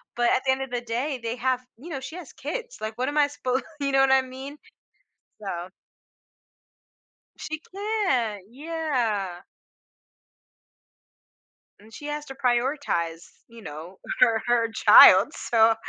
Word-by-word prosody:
but 240 0 +2
at - - +1
the 265 - +4
end 265 - -4
of 265 - -9
the 245 -1 -2
day, 250 +4 -3
they 230 +1 -2
have 255 +1 0 0.2
you 315 +8 -11
know, 280 -5 -4
she 280 +6 -8
has 340 -6 -10
kids. 470 - -6
Like, 220 +1 -5
what 255 +3 -1
am 295 - -4
I 290 -1 +5
suppo 260 -2 -2 0.2
you 275 -1 0
know 270 - +4
what 270 - +4
I 265 - +5
mean? 265 +3 -9 0.9
So 175 -2 -5 1.7
She 315 0 -5
can't, 360 - -2
yeah. 245 - -2 2.4
And 220 +1 -18
she 290 - -10
has 295 0 -4
to 270 - -8
prioritize, 240 - -1 0.2
you 230 -1 -14
know, 165 +2 -9 0.2
her 225 -3 +4
her 230 -2 +2
child, - - +8
so 225 -1 +3
255 Hz, 145 wpm, -25 LUFS, 225-285 Hz, 2.4 s, child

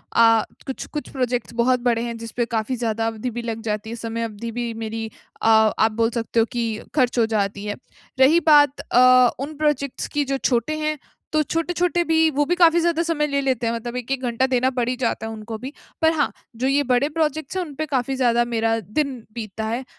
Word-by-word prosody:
अ, 225 -1 +5 0.2
कुछ-कुछ 290 +2 -5
प्रोजेक्ट्स 250 -2 -2
बहुत 245 +2 +2
बड़े 230 -1 +1
हैं, 235 -1 -4
जिसपे 230 +1 -3
काफ़ी 220 +4 -1
ज़्यादा 225 -2 -1
अवधि 225 +2 -3
भी 240 0 -5
लग 230 -1 -4
जाती 210 +1 -3
है। 230 - -5
समय 230 0 -3
अवधि 230 +1 -5
भी 235 0 -3
मेरी 220 0 -4 0.3
अ, - - +1
आप 220 0 +4
बोल 225 0 +3
सकते 230 0 -1
हो 225 - +4
कि 230 -2 -2 0.2
खर्च 255 -4 +2
हो 230 - +4
जाती 205 -2 -2
है। 205 0 -3 0.4
रही 285 +6 +6
बात 290 -2 +6
अ, 255 0 +6
उन 290 +3 -5
प्रोजेक्ट्स 295 -3 -1
की 290 -1 -1
जो 275 0 -1
छोटे 255 +3 0
हैं। 305 0 -1 0.4
तो 310 - +3
छोटे-छोटे 345 +2 0
भी 320 -1 +3
वो 290 - +3
भी 355 - +1
काफ़ी 340 -1 +5
ज़्यादा 335 -1 +1
समय 320 -3 0
ले 280 -1 0
लेते 255 -4 0
हैं। 230 - 0
मतलब 235 +1 -5
1-1 255 +2 -3
घंटा 240 +2 +1
देना 255 +1 +3 0.2
ही 250 - 0
जाता 230 -2 -1
है 225 - -4
उनको 220 +1 -7
भी। 255 +5 -7 0.3
पर 320 0 +5
हाँ, 295 -3 +1 0.2
जो 250 +3 -1
ये 280 +1 +2
बड़े 250 +4 +3
प्रोजेक्ट्स 315 +1 -2
हैं, 370 - 0
उनपे 305 0 -5
काफ़ी 270 -2 -1
ज़्यादा 240 -2 +2
मेरा 225 -1 0
दिन 265 - -2 0.2
बीतता 220 -1 -5
है, 230 +4 -2
245 Hz, 215 wpm, -22 LUFS, 225-290 Hz, 0.4 s, रही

